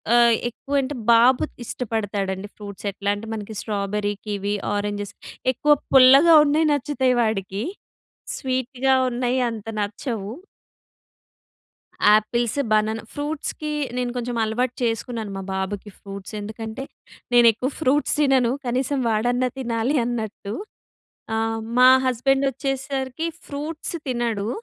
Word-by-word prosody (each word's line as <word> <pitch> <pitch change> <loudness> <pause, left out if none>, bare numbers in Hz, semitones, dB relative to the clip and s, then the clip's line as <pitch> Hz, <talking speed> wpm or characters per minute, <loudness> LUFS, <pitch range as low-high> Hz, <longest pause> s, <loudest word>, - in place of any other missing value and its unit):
ఆహ్, 235 -1 +6
ఎక్కువ 275 +4 -9
అంటే 275 +2 -4 0.2
బాబు 240 +2 +5 0.2
ఇష్టపడతాడండి. 205 -5 -3
ఫ్రూట్స్ 205 -1 -9
ఎట్లా 200 +1 -1
అంటే 215 +2 -8
మనకి 215 0 -7
స్ట్రాబెర్రీ, 205 0 -2
కివి, 205 0 -1 0.2
ఆరెంజెస్ 205 0 -3 0.4
ఎక్కువ 295 +4 +4 0.2
పుల్లగా 275 +5 +8
ఉన్నయి 305 +2 +2
నచ్చుతాయి 275 -2 +1
వాడికి. 200 -2 -2 0.7
స్వీట్‍గా 260 0 0
ఉన్నయి 250 +1 0
అంత 225 -2 -7
నచ్చవు. 205 +1 -4 1.8
Apples, 235 +4 0
banana. 215 +1 +2
ఫ్రూట్స్‌కి 300 +1 -4 0.3
నేను 250 -1 -1
కొంచెం 245 0 -3
అలవాటు 240 +3 -1
చేసుకున్నాను 225 -2 -2
మా 195 - -5
బాబుకి 190 +2 -3
ఫ్రూట్స్. 200 0 -9
ఎందుకంటే 220 +4 -6 0.5
నేనెక్కువ 240 +1 +5
ఫ్రూట్స్ 290 -1 +2
తినను. 265 -5 +3 0.2
కనీసం 260 +3 0
వాడన్నా 245 +3 +1
తినాలి 240 +1 -1
అన్నట్టు. 220 -4 -4 0.8
ఆ! - - 0 0.4
మా 255 0 +8 0.2
హస్బెండ్ 270 +2 +2
వచ్చేసరికి 270 +2 -3 0.2
ఫ్రూట్స్ 300 +4 -5
తినడు. 235 -4 -1
240 Hz, 110 wpm, -23 LUFS, 210-265 Hz, 1.8 s, పుల్లగా